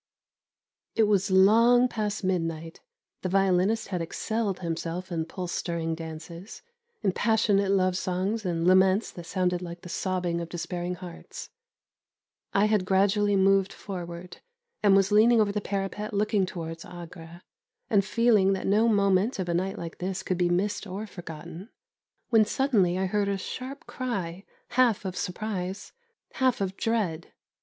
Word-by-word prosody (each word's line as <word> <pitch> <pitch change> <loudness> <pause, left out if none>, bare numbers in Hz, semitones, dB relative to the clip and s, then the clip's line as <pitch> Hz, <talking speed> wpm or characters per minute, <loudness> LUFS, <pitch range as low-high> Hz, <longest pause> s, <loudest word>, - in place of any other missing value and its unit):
It 225 - +4
was 200 -2 +2
long 230 +6 +6
past 210 -3 -3
midnight; 165 -3 -2 0.4
the 185 - -2
violinist 195 +3 +2
had 180 -3 -2
excelled 205 +3 -2
himself 170 +2 -4
in 165 -2 -1
pulse 180 +1 -5
stirring 165 -1 -2
dances, 165 +3 -8 0.4
in 195 - +3
passionate 205 -2 +2
love 185 -2 +2
songs 190 +5 -1
and 170 -3 -1
laments 185 +3 +4
that 175 -1 -10
sounded 180 -1 0
like 170 -1 -7
the 180 - -10
sobbing 180 -2 -1
of 170 - -6
despairing 175 +1 -4
hearts. 180 -1 -10 1.0
I 200 +1 +3
had 210 -3 +2
gradually 200 +2 +2
moved 195 0 +3
forward, 175 -2 -8 0.4
and 200 -2 +5
was 195 +1 +3
leaning 225 +3 +6
over 210 -2 +3
the 210 0 -2
parapet 200 +2 -3
looking 205 -2 +1
towards 165 -2 -6
Agra, 170 0 -11 0.4
and 200 -2 +3
feeling 210 -2 +3
that 190 - -3
no 210 +4 +3
moment 200 +1 +2
of 185 -2 -3
a - - +1
night 190 +4 -1
like 165 -1 -7
this 190 +1 -3
could 185 -1 -2
be 175 -1 +2
missed 200 +4 0
or 195 +3 -5
forgotten, 175 +1 -9 0.6
when 225 -3 +6
suddenly 210 -7 +1
I 190 - 0
heard 200 +1 0
a 200 - 0
sharp 260 +8 -7
cry, 195 -7 -4 0.2
half 240 -5 +2
of 185 -1 -3
surprise, 190 0 -4 0.4
half 260 -2 +1
of 190 -1 -2
dread. 195 -9 -1
190 Hz, 150 wpm, -27 LUFS, 175-210 Hz, 1.0 s, long